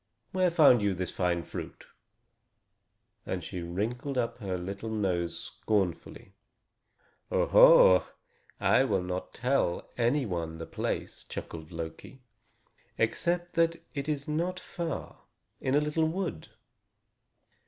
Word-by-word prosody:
Where 185 -1 +3
found 150 -8 +6
you 100 -2 +1
this 90 0 -3
fine 90 -2 0
fruit?" - - -8 1.4
and - - -4
she 90 - -5
wrinkled 115 +10 -3
up 120 0 -1
her 95 -4 -3
little 100 +5 -5
nose 90 -6 -1
scornfully. 95 -2 -2 1.0
"Oho! - - +7 0.5
I 130 - +4
will 100 -8 +1
not 90 0 -4
tell 125 -8 0
any 125 +4 +2
one 85 -5 -3
the 80 - -6
place," - - -4
chuckled 80 0 -8
Loki, 85 +10 -8 0.7
"except 175 +9 0
that 165 0 +3 0.2
it 140 0 -3
is 145 -2 -2
not 170 +4 -1
far, 170 -3 -5 0.4
in 130 0 0
a - - +6
little 150 +2 +1
wood. 170 - -3
120 Hz, 120 wpm, -29 LUFS, -, 1.4 s, Oho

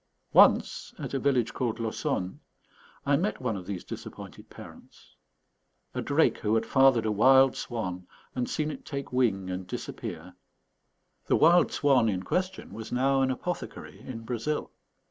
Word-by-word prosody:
Once, - - +4
at - - -6
a 135 - 0
village 130 -5 +1
called 120 -3 -2
Laussonne, 110 -4 -2 0.7
I 140 0 +3
met 195 +7 -1
one 125 -4 -2
of 90 -2 -7
these 95 -3 -4
disappointed - - -9
parents: - - -14 0.8
a - - -2
drake - - +2
who 105 +1 +1
had 115 0 +1
fathered 135 -4 +4
a 110 - +1
wild 130 +5 +5
swan 90 -7 -4 0.3
and 125 -1 -2
seen 155 0 -1
it - - -9
take 140 -3 -6
wing 95 -7 +1
and 90 0 -5
disappear. 90 0 -6 0.9
The - - +3
wild 170 +2 +5
swan 130 -6 +3
in 95 -2 -2
question 185 - -3
was 110 0 -8
now 135 +2 +2
an 130 - +2
apothecary 175 +7 -5
in 120 -3 -8
Brazil. 120 +6 -3
125 Hz, 155 wpm, -28 LUFS, 105-135 Hz, 0.9 s, wild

